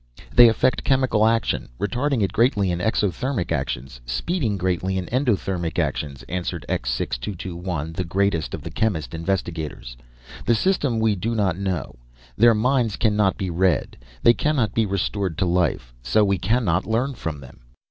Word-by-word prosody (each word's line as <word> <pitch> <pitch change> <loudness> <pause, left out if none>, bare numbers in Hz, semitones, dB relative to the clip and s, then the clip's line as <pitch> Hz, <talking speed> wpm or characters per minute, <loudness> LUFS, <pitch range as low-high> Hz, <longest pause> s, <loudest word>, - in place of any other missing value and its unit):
"They 120 -1 +9
affect 115 +3 +1
chemical 130 -5 +3
action, 115 0 0
retarding 125 +2 0
it 95 - -1
greatly 105 -5 +2
in 85 - -2
exothermic 105 - -1
actions, 65 -4 -3
speeding 105 - -1
greatly 95 +1 -1
endothermic 95 - -1
actions," 70 -3 -2
answered 90 +1 -4
X - - -2
6221, 85 +5 -3
the 90 - -2
greatest 95 -1 0
of - - -10
the - - -6
chemist 90 -10 -1
investigators. 80 -7 -3 0.5
"The 120 - +3
system 140 - +1
we 110 -1 +3
do 115 +5 -2
not 100 -6 +1
know. 90 -10 -3 0.4
Their 115 +1 +6
minds 120 -1 +1
cannot 105 -3 +2
be 95 -2 -3
read, 90 -2 +1 0.3
they 120 - +7
cannot 125 0 0
be 110 -2 +1
restored 95 -2 -2
to 95 - +1
life, 85 -9 0
so 105 - +3
we 100 -2 +1
cannot 95 -3 +1
learn 120 +5 0
from 80 - -5
them." 65 -2 -14
95 Hz, 155 wpm, -23 LUFS, 85-115 Hz, 0.5 s, They